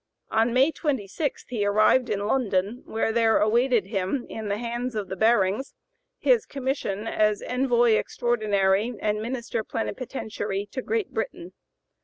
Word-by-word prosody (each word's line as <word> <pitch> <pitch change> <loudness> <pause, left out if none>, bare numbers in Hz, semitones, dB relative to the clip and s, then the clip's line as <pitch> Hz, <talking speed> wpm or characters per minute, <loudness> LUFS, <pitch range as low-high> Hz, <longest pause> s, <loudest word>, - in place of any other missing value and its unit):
On 225 +2 +2
May 265 +6 +4
26 280 - -2
he 230 -4 -1
arrived 215 +5 +3
in 205 -1 -1
London, 210 -2 0
where 225 0 0
there 225 -1 +3
awaited 235 0 +3
him, 195 +5 -2
in 220 -1 -5
the 200 0 -1
hands 240 +1 -3
of 205 -3 -3
the 190 - -3
Barings, 215 +3 +2 0.4
his 475 -3 +2
commission 260 -7 -3
as 215 -2 +1
Envoy 245 -2 +2
Extraordinary 215 -2 +1
and 210 0 -1
Minister 235 -1 -3
Plenipotentiary 215 -4 -4
to 260 - -3
Great 440 - -2
Britain. - - -4
225 Hz, 140 wpm, -25 LUFS, 205-250 Hz, 0.4 s, May